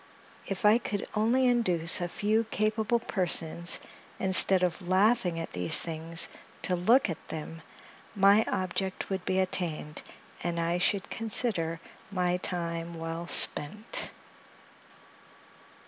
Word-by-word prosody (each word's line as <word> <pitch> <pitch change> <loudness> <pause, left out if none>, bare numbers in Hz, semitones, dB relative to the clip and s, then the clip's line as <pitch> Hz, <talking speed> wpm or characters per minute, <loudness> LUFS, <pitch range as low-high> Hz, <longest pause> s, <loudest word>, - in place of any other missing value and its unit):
If 195 +1 -4
I 215 +3 +5
could 205 -4 -5
only 235 +5 +1
induce 185 -10 +4
a 175 - -2
few 215 +5 -1
capable 215 +2 0
persons, 175 -6 +1 0.4
instead 190 0 +5
of 180 0 -2
laughing 190 -1 +1
at 165 - -6
these 90 -1 +3
things, 165 0 +1 0.4
to 180 - +2
look 225 +10 +3
at 165 - -7
them, 160 +1 -8 0.5
my 200 +2 +4
object 190 0 -3
would 190 -1 -3
be 185 - -1
attained, 170 -5 -2 0.4
and 170 -1 -3
I 170 +1 -1
should 195 +1 -1
consider 205 -7 -1 0.3
my 180 -2 -1
time 170 -2 -4
well 165 +1 -6
spent. 210 +7 +1
185 Hz, 120 wpm, -28 LUFS, 170-210 Hz, 0.5 s, I